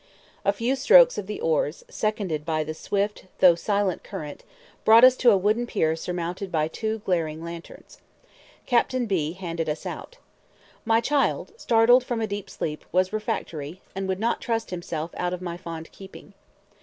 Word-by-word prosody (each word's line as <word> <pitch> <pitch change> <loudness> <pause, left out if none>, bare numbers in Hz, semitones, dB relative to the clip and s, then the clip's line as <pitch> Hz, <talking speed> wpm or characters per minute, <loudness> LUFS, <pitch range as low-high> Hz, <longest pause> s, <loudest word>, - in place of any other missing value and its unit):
A 200 - +3
few 230 +6 -1
strokes - - +6
of 190 - -6
the 210 - -5
oars, 155 -1 -1
seconded 200 -8 -2
by 155 -1 -1
the 155 +1 -5
swift 200 +4 -2
though 180 -2 +7
silent 200 +2 -1
current, 150 -2 -8 0.4
brought 225 +2 +7
us 255 0 +8
to 245 - +5
a 205 - +5
wooden 215 +5 +1
pier 160 -7 +1
surmounted 180 +3 -4
by 155 -2 +1
two 220 +5 -4
glaring 160 -3 -1
lanterns. 170 0 -10 0.7
Captain 245 0 +1
B 165 -7 -1
handed 165 -3 -4
us 150 +1 -4
out. - - -7 0.7
My 225 0 +3
child, 285 - 0
startled 245 - +4
from 240 -2 -3
a 225 - 0
deep 200 -2 -5
sleep, 150 -1 -5
was 185 +2 +1
refractory, 170 -6 -4
and 195 0 -3
would 190 0 -2
not 230 +2 0
trust 225 -3 -2
himself 170 -2 -4
out 180 0 -1
of 180 - -12
my 170 -1 -4
fond 165 -2 -8
keeping. 195 +1 -13
190 Hz, 170 wpm, -25 LUFS, 165-225 Hz, 0.7 s, us